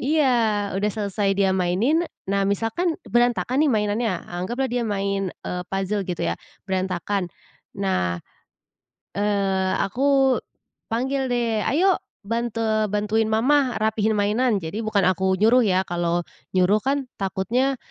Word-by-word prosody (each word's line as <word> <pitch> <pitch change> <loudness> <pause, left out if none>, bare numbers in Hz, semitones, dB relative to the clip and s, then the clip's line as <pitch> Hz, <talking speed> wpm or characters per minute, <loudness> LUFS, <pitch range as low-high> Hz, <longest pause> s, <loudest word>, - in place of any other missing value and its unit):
iya, 295 +2 +2 0.5
udah 210 +2 +1
selesai 200 -1 -1
dia 195 -1 +3
mainin 205 - +2 0.2
nah, 200 0 +1
misalkan 225 - 0
berantakan, 245 +3 +2
nih, 290 - +3
mainannya, 210 0 0 0.2
anggaplah 235 +10 -2
dia 245 -1 0
main, 195 -2 -1 0.2
eee, 180 0 -3
puzzle 195 +1 -1
gitu, 175 -2 -3
ya, - - 0 0.3
berantakan, 190 0 -1 0.5
nah, 90 - 0 1.0
eee, 195 -2 +1
aku 270 +3 +2 0.5
panggil, 265 +3 -1
deh, 230 -3 0
"Ayo 370 +5 +3 0.3
bante 225 -2 0
bantuin 210 +1 +1
Mama, 255 +3 +2
rapihin 220 0 +1
mainan," 215 +2 +2
jadi 200 +8 -4
bukan 205 -3 +1
aku 190 +1 +2
nyuruh, 235 +4 +5
ya, 185 -1 +3
kalau 175 0 0 0.3
nyuruh, 185 +4 +4
kan, 275 +1 0 0.2
takutnya, 235 +8 0
210 Hz, 125 wpm, -23 LUFS, 195-245 Hz, 1.0 s, nyuruh